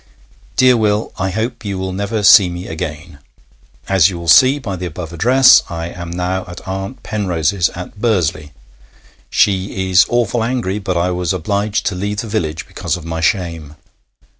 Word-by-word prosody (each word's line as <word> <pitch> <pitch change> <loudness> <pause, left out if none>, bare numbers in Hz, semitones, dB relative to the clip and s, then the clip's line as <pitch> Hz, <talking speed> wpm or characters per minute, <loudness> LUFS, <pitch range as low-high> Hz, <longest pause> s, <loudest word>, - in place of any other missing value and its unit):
Dear 130 -1 +5
Will, 105 -1 0
I 95 0 0
hope 110 +5 -3
you 100 -2 -4
will 95 0 -4
never 100 +3 -2
see 95 -1 +7
me 90 +1 -6
again. 80 -1 -7 0.7
As 95 -3 +4
you 90 - -6
will 85 0 -8
see 130 - +6
by 110 -9 -5
the 90 0 -5
above 85 0 -8
address, 125 +9 +6
I 85 0 -5
am 85 -1 -8
now 90 +2 -2
at 90 +1 -10
Aunt 95 +1 -5
Penrose's 95 -3 0
at 90 +4 -9
Bursley. 85 -10 0 0.8
She 95 -1 0
is 90 +1 +5
awful 120 -1 0
angry, 115 -5 -2
but 95 -3 -2
I 90 +2 0
was 90 -1 -1
obliged 100 +4 -2
to 100 - 0
leave 100 +3 -3
the 115 - -7
village 85 -7 -3
because - - -3
of 85 - -11
my 80 0 -4
shame. 80 -4 -2
95 Hz, 175 wpm, -17 LUFS, 85-105 Hz, 0.8 s, see